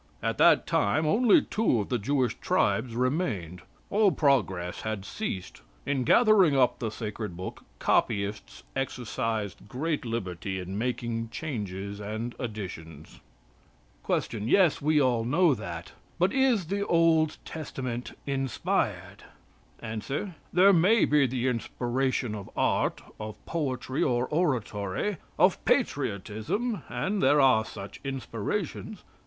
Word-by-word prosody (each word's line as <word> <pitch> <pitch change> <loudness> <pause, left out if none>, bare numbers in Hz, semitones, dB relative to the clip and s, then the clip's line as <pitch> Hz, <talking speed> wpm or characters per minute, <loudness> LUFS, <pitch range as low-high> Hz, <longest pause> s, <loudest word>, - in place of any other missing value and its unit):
At - - -1
that - - +6
time 125 +11 +1
only 235 - +5
two 215 - +1
of 100 - -3
the 125 - 0
Jewish 130 +2 +1
tribes 120 -3 +1
remained. 120 - -1 0.3
All 205 -1 +4
progress 95 - +1
had 110 -3 -4
ceased. 100 - -5 0.2
In 135 -3 0
gathering 200 - +5
up 125 -2 +3
the 115 - -2
sacred 105 -4 -5
book, 90 - -7
copyists 100 +1 0
exercised 115 -6 -3
great 150 +5 -2
liberty 95 -5 -3
in 95 +1 -6
making 115 0 -2
changes 100 - -5
and 110 +3 -4
additions." 90 - -7 0.8
Q. 115 - -1
Yes, 155 - +3
we 155 +2 +2
know 145 - +5 0.2
all 165 +2 +4
that, 85 -7 -6 0.3
but 180 +2 +2
is 260 -8 +3
the 200 +4 -1
Old 165 -2 +3
Testament 130 -6 -5
inspired? 135 -3 -2 0.6
A. 110 -1 -4 0.5
"There 195 +3 +6
maybe 170 -6 +4
the 125 0 -1
inspiration 125 0 -1
of 100 -2 -7
art, - - +1 0.2
of 110 0 -6
poetry, 135 -5 -2
or 120 0 +2
oratory; 130 - -1 0.2
of - - +3
patriotism 110 - -1
and 185 - -1
there 145 - +5
are 130 -5 +5
such 100 -2 -9
inspirations. 135 -3 -4
125 Hz, 120 wpm, -28 LUFS, 105-155 Hz, 0.8 s, that